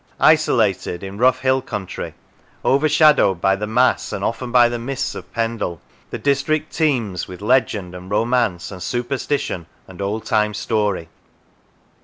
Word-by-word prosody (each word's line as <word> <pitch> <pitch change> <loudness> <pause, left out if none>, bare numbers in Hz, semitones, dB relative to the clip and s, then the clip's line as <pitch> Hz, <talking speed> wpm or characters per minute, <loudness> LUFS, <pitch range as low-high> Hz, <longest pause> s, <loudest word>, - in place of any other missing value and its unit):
Isolated, 110 - +2
in 95 +1 -7
rough 130 +1 +3
hill 130 0 +2
country, 100 -7 -6 0.5
overshadowed 150 - +4
by 95 +2 +3
the 105 +2 -4
mass 125 +4 +2
and 100 - -4
often 120 +3 -2
by 120 -1 +6
the 120 0 -3
mists 130 +3 -3
of - - -9
Pendle, 115 -7 -2 0.3
the - - -4
district 140 +2 0
teems 120 - 0
with 90 - -9
legend 105 -5 +1
and 90 +1 -9
romance 115 -4 0
and 95 -2 -9
superstition 120 - -2 0.2
and 95 0 -10
old 105 +3 -3
time 105 -1 +1
story. 105 -6 -1
115 Hz, 145 wpm, -20 LUFS, 95-130 Hz, 0.5 s, by